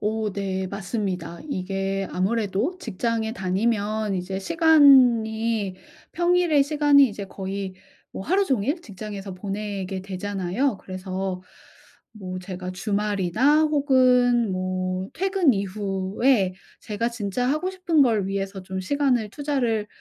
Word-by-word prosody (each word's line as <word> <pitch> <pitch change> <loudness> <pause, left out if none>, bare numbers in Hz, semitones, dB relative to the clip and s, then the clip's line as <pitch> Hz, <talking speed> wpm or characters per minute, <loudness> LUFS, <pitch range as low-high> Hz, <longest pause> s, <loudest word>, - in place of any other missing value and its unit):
오 215 0 -1
네 190 -1 -2
맞습니다. 185 -4 -4
이게 195 -2 -2
아무래도 215 - 0
직장에 225 - -2
다니면 210 +1 -1
이제 190 +1 -3
시간이 230 - +4 0.4
평일에 345 -4 +3
시간이 285 -1 +4
이제 205 -2 -6
거의 195 0 -5 0.4
뭐 - - -6
하루 380 - +2
종일 275 - 0
직장에서 200 - -8
보내게 195 -1 -4
되잖아요. 195 +4 -2
그래서 185 0 -5 0.7
뭐 185 -4 -6
제가 185 0 -6
주말이나 210 - +1
혹은 255 -6 +3
뭐 185 0 -2
퇴근 380 -5 +2
이후에 195 +2 0 0.3
제가 215 +2 -2
진짜 235 +1 -2
하고 310 +6 0
싶은 355 -4 +1
걸 220 -7 +2
위해서 195 0 -3
좀 190 0 -5
시간을 250 0 +1
투자를 250 -6 -1
210 Hz, 260 characters per minute, -24 LUFS, 190-255 Hz, 0.7 s, 시간이